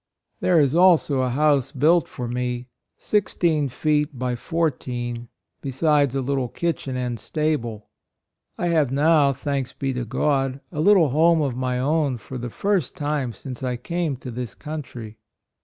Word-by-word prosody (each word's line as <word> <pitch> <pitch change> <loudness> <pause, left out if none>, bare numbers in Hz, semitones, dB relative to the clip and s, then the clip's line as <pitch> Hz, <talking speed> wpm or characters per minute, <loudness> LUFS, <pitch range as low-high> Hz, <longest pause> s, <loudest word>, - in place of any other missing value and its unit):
" - - -52
There 180 -3 +4
is 140 -2 +3
also 170 -5 +4
a 130 -1 +1
house 140 0 +2
built 155 +4 +3
for 125 -2 -6
me, 125 0 -3 0.3
sixteen 170 -8 +1
feet 150 +1 0
by 125 0 -1
fourteen, 120 -6 -2 0.3
be 140 - -4
sides 145 0 +2
a 135 - 0
little 135 -1 -1
kitchen 140 -3 -3
and 125 -2 -3
stable. 120 -7 -2 0.7
I 175 - 0
have 155 -6 +2
now, 145 0 +4
thanks 135 -1 -3
be 135 -1 -2
to 125 -1 -2
God, 135 +2 0
a 155 -3 -2
little 185 -4 +5
home 160 +3 +4
of 135 -4 -1
my 125 0 -1
own 140 0 +1
for 125 +3 -8
the 120 0 -4
first 195 - -1
time 145 -6 -1
since 130 +1 -9
I 125 -2 -2
came 170 +1 -2
to 125 0 -8
this 120 0 -6
country." 125 -8 -7
140 Hz, 165 wpm, -23 LUFS, 125-155 Hz, 0.7 s, little